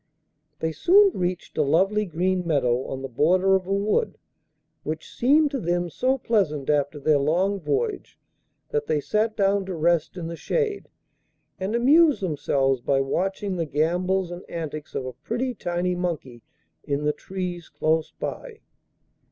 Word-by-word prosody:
They 160 - 0
soon 390 - +5
reached 180 -2 -3
a - - +5
lovely 195 +9 +2
green 180 +1 0
meadow 130 -7 +1
on 135 0 -5
the - - -3
border 180 +9 +3
of 185 -1 -1
a - - -3
wood, 210 - 0 0.6
which 485 - -5
seemed 290 +4 +3
to 275 - -2
them 175 -1 -1
so 260 +8 +1
pleasant 160 - 0
after 145 0 0
their 145 +1 +3
long 180 +8 +1
voyage 425 - -2 0.5
that 450 -1 -1
they 155 - +1
sat 215 +8 0
down 195 -1 +2
to 185 - -4
rest 170 +1 +1
in 175 - -5
the 170 +1 -5
shade 430 - -2 0.7
and 195 +4 -2
amused 295 +5 +5
themselves 135 -5 0
by 135 +2 +1
watching 190 +7 -1
the 165 -2 -1
gambols 175 +5 0
and 175 +1 -6
antics 155 -2 -6
of 130 - -2
a 130 - -5
pretty 235 - -3
tiny 175 -3 -2
monkey 165 -9 -4 0.4
in 145 +1 -2
the 150 0 +1
trees 180 -2 -6
close 160 0 0
by. - - -6
180 Hz, 160 wpm, -24 LUFS, 150-210 Hz, 0.7 s, soon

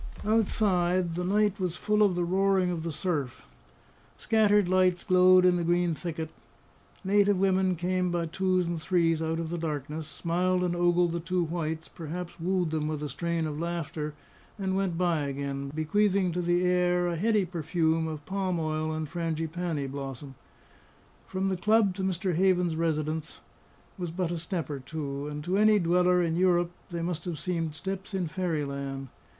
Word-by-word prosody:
Outside, 185 -5 +2
the 180 +2 -2
night 205 +2 +1
was 180 -2 -1
full 210 +3 +1
of 200 -4 +4
the 175 - 0
roaring 190 +1 +2
of 170 -2 -3
the 165 0 -3
surf. 145 -5 -3 0.7
Scattered 210 -3 +3
lights 185 -1 +2
glowed 185 -1 +6
in 180 -1 +4
the 175 - -1
green 175 0 +2
thicket. 160 -1 -5 0.7
Native 200 0 +3
women 190 -1 +2
came 180 +1 0
by 175 -1 -1
twos 185 +2 +1
and 170 -1 -3
threes 165 -1 +2
out 160 0 -1
of 165 -1 -4
the 175 - -2
darkness, 150 -1 -4
smiled 180 +3 0
and 175 -1 0
ogled 175 0 +3
the 170 - -2
two 175 +2 0
whites, 160 -1 -3
perhaps 170 +2 -7
wooed 180 -1 0
them 155 -1 -1
with 155 -1 -3
a 150 - -3
strain 170 +3 -2
of 150 -1 -4
laughter, 160 -3 -3 0.4
and 190 -2 -1
went 190 -3 0
by 170 -5 +1
again, 140 0 -4
bequeathing 185 +5 +1
to 180 +2 -1
the 175 +1 +1
air 180 0 +2
a 175 -1 -1
heady 210 +2 +2
perfume 165 -1 0
of 155 -2 -6
palm 190 -2 -1
oil 155 0 -1
and 155 0 -3
frangipani 165 -1 -2
blossom. 135 0 -6 0.9
From 190 +1 -1
the 190 - 0
club 215 0 +3
to 190 - -4
Mr. 185 0 -1
Havens's 180 -1 +2
residence 160 -1 -2 0.6
was 175 -2 -3
but 175 0 -2
a 175 - -2
step 170 0 -3
or 145 -2 -4
two, 140 0 -5
and 150 0 -5
to 185 +5 0
any 215 0 +6
dweller 180 0 +3
in 165 -1 0
Europe 175 -1 +2 0.2
they 170 -1 -3
must 170 -1 -3
have 175 -3 -3
seemed 165 -3 -2
steps 195 +5 -5
in 180 -3 -1
fairyland. 140 -6 -3
175 Hz, 175 wpm, -28 LUFS, 160-185 Hz, 0.9 s, glowed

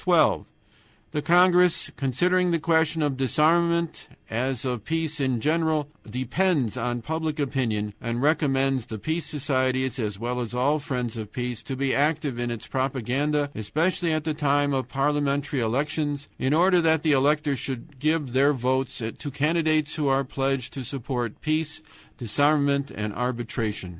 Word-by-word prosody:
"12. - - +3 0.7
The 150 - -1
congress, 180 +1 +4
considering 180 +7 +1
the 170 - +2
question 160 -1 +2
of 145 -2 0
disarmament, 165 +5 +2 0.2
as 125 +2 -1
of 125 -4 -2
peace 160 +2 -2
in 130 -3 +1
general, 155 +1 +1 0.2
depends 130 - 0
on 120 -1 -2
public 160 +2 -2
opinion, 115 -7 -1
recommends 135 0 +1
the 110 - -5
peace 160 +9 -2
societies, 130 -3 0
as 105 -4 -2
well 120 +3 -3
as 120 0 -5
all 140 +5 +2
friends 125 -5 -3
of 110 -2 -6
peace, 125 -2 -4
to 135 - -5
be 135 0 0
active 145 -3 0
in 120 0 -1
its 115 -2 -5
propaganda, 140 +3 -1
especially 165 - 0
at 155 -1 0
the 155 0 -1
time 145 -1 +1
of 130 -2 -1
parliamentary 145 0 0
elections, 145 +4 -1
in 130 - 0
order 180 +3 +4
that 160 -1 +2
the 155 - +3
electors 145 0 +2
should 135 +2 -6
give 150 -3 0
their 140 +3 +4
votes 130 0 -1 0.2
to 145 - -4
candidates 155 +2 +1
who 150 -3 -1
are 135 0 +3
pledged 135 -1 -2
to 135 - -5
support 125 -3 -4
Peace, 155 0 -1 0.4
Disarmament, 140 +3 +2
and 105 -1 -4
Arbitration. 115 -5 -3
140 Hz, 155 wpm, -25 LUFS, 125-155 Hz, 0.7 s, congress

